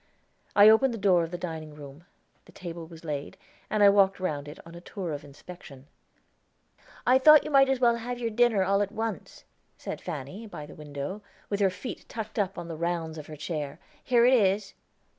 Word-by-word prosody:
I 205 0 +8
opened 230 +3 +5
the - - -6
door 190 -4 +3
of 165 - -4
the 175 - -5
dining 160 -3 -6
room; 145 +2 -12 0.4
the - - -17
table 170 -2 -8
was 165 0 -13
laid, 145 -2 -5 0.3
and 215 -1 +2
I 200 - +9
walked 195 -1 +3
round 150 -6 -3
it, 150 - -9
on 165 - -12
a 170 - -10
tour 180 -3 -5
of 145 0 -6
inspection. 145 -1 -13 1.2
"I 255 +1 +5
thought 305 +2 +8
you - - -6
might 270 -1 +5
as 265 -1 +1
well 235 -2 +3
have 245 +2 -5
your 235 -2 -3
dinner, 225 -3 +3
all 200 +2 +2
at 200 -1 -1
once," 225 0 -5 0.3
said - - -6
Fanny, 175 - -7
by 150 -7 -8
the 150 - -12
window, 150 +6 -6 0.3
with 200 - 0
her 195 -2 +4
feet 195 +7 -8
tucked 220 -1 -5
up 195 -1 -1
on 170 - -6
the 165 - -6
rounds 165 -1 -3
of 150 - -10
her 155 - -8
chair. 150 -1 -5 0.2
"Here 240 -2 +4
it 255 - +5
is." 200 -3 +2
185 Hz, 210 wpm, -27 LUFS, 155-220 Hz, 1.2 s, I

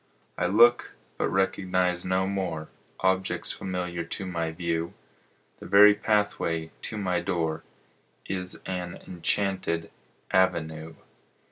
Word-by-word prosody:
I - - 0
look, 120 +5 +5 0.2
but - - +1
recognize 90 -2 +1
no 95 +1 +1
more 95 -5 -3 0.3
Objects 95 0 +1
familiar 90 -2 -3
to 95 +3 -5
my 85 -3 -2
view; 85 0 -2 0.6
The - - -9
very 105 +2 +8
pathway 100 -7 0 0.2
to 110 - -5
my 90 -4 0
door 85 -2 -2 0.6
Is 90 -1 -2
an 90 -2 -4
enchanted 90 -2 -1 0.4
avenue. 80 -4 +1
90 Hz, 110 wpm, -27 LUFS, 85-95 Hz, 0.6 s, very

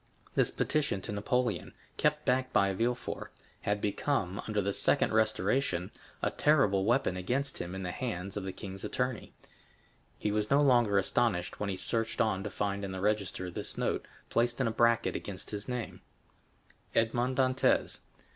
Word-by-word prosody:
This - - +3
petition 145 -9 0
to - - -5
Napoleon, 125 +5 -1 0.2
kept 150 0 +1
back 130 +1 +1
by 100 0 +3
Villefort, 120 +5 -2 0.3
had 105 0 0
become, 100 -2 -1
under 105 -1 0
the 100 0 0
second - - +3
restoration, 110 -3 +1 0.3
a - - +2
terrible 105 -11 +3
weapon 115 -4 +2
against 130 +10 -1
him 90 +2 -5
in 95 - -4
the 90 - -2
hands 100 -4 -4
of 105 - -3
the 95 - -3
king's 95 0 -7
attorney. 125 -2 -2 0.9
He 105 - -1
was 105 0 0
no 140 - +5
longer 120 -7 +4
astonished 95 -2 +1
when 105 - -1
he 95 - -2
searched 115 +2 -1
on 105 -4 +2
to 105 - -3
find 100 0 -2
in 95 -1 -4
the 95 - -4
register 100 -3 -1
this - - -3
note, - - -1 0.2
placed 120 +1 +2
in 130 - +2
a - - +1
bracket 115 0 +3
against 95 -4 -5
his 105 +3 -5
name: 125 -2 -4 0.9
Edmond 120 +3 +1
Dantès. 130 0 +2
105 Hz, 165 wpm, -31 LUFS, 95-125 Hz, 0.9 s, no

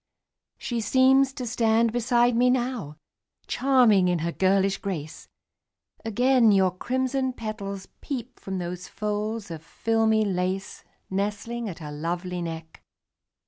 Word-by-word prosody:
She 235 -2 -3
seems 265 +3 +4
to 255 - -5
stand 230 -1 +2
beside 240 0 +2
me 250 +2 +4
now, 245 - -1 0.5
Charming 240 -8 +4
in 180 -1 +2
her 170 - -1
girlish 195 +2 +2
grace; 160 -6 -6 0.8
Again 245 +1 +3
your 190 -2 +4
crimson 260 +4 -1
petals 200 -4 -6
peep 255 -3 -6
From 190 -1 -5
those 180 0 -5
folds 210 -1 -3
of 160 -2 -6
filmy 220 +5 +1
lace 190 0 -2 0.3
Nestling 210 +4 -2
at 175 - -7
her 150 -4 -8
lovely 175 +4 -3
neck. 165 -1 -7
215 Hz, 125 wpm, -25 LUFS, 185-240 Hz, 0.8 s, seems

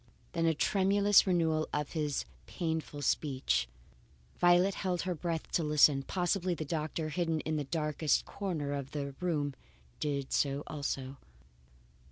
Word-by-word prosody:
Then 165 -2 +1
a 160 - +3
tremulous 200 +4 +4
renewal 160 -3 +1
of 150 -1 -2
his 150 -4 -1 0.2
painful 160 -4 -3
speech. 130 - +1 0.7
Violet 175 +2 +5
held 180 -2 -2
her 185 - -1
breath 165 -1 -3
to 170 - +1
listen. 150 -2 +5
Possibly 180 +3 0
the 155 - -4
doctor, 155 +1 -2
hidden 165 0 0
in 155 - -2
the 145 - -2
darkest 150 0 0
corner 160 -8 -3
of 140 0 -5
the 140 -2 -3
room, 150 -6 -1 0.5
did 140 -2 -2
so 140 0 +1
also. 140 -3 -4
155 Hz, 140 wpm, -32 LUFS, 145-175 Hz, 0.7 s, Violet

